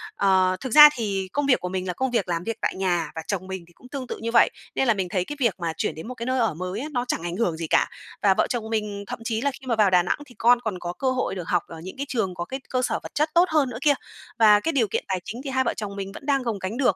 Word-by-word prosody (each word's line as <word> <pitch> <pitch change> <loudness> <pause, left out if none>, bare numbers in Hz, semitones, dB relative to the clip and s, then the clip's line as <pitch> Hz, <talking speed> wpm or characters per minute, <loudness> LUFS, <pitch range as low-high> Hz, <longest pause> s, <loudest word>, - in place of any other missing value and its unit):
Ờ, 190 -2 +3
thực 260 -4 -5
ra 300 0 +11
thì 195 -4 -2
công 290 - +1
việc 270 -2 +4
của 180 - -4
mình 185 0 -3
là 180 - -1
công 260 +6 -1
việc 230 -6 0
làm 170 0 -1
việc 225 +3 -3
tại - - 0
nhà 180 -3 0
và 160 - -3
chồng 185 -2 -3
mình 190 -2 -5
thì 175 - -21
cũng 250 - -17
tương 270 -3 -5
tự - - -5
như 230 - -2
vậy. 230 - +6 0.3
Nên 265 - +1
là 235 - +5
mình 190 -3 -2
thấy 180 -1 0
cái 295 - -6
việc 235 -6 +2
mà 170 -2 -2
chuyển - - -1
đến 160 +6 -8
một 255 - -5
cái 235 - -5
nơi 255 +1 0
ở 225 -8 +2
mới 185 +5 -4
á, 285 - -4
nó 245 -3 -1
chẳng 165 - -1
ảnh 175 0 -3
hưởng 180 -7 0
gì 165 -1 -4
cả. - - +3 0.3
Và 200 -2 +5
vợ - - +1
chồng 225 -3 -3
mình 210 -2 -2
thậm - - -5
chí 225 -1 -1
là 280 +2 +1
khi 265 0 -13
mà 235 - +1
vào 210 -3 +4
Đà 180 -1 +4
Nẵng - - 0
thì 250 -4 -17
con 240 +1 +5
còn 215 -6 -3
có 175 0 -4
cơ 260 +7 0
hội 255 -6 -1
được 175 -3 -6
học 175 -2 +1
ở 165 - -9
những 185 - -8
cái 280 - -3
trường 220 -8 -1
có 175 - -4
cái 265 +8 -5
cơ 255 - 0
sở - - 0
vật - - -10
chất 305 +2 +2
tốt 345 - +7
hơn 300 -5 +2
nữa 225 - -6
kia. 290 -1 +5 0.5
Và 210 -2 +7
cái 325 - -1
điều 250 -8 +2
kiện - - -2
tài 190 -1 -1
chính 240 +4 -6
thì 275 - -4
hai 260 0 +1
vợ - - 0
chồng 205 -2 -5
mình 195 -1 -5
vẫn - - -10
đang 275 -2 +1
gồng 230 -4 -2
gánh 190 +6 -4
được. 250 -8 +3
220 Hz, 335 wpm, -24 LUFS, 185-255 Hz, 0.5 s, ra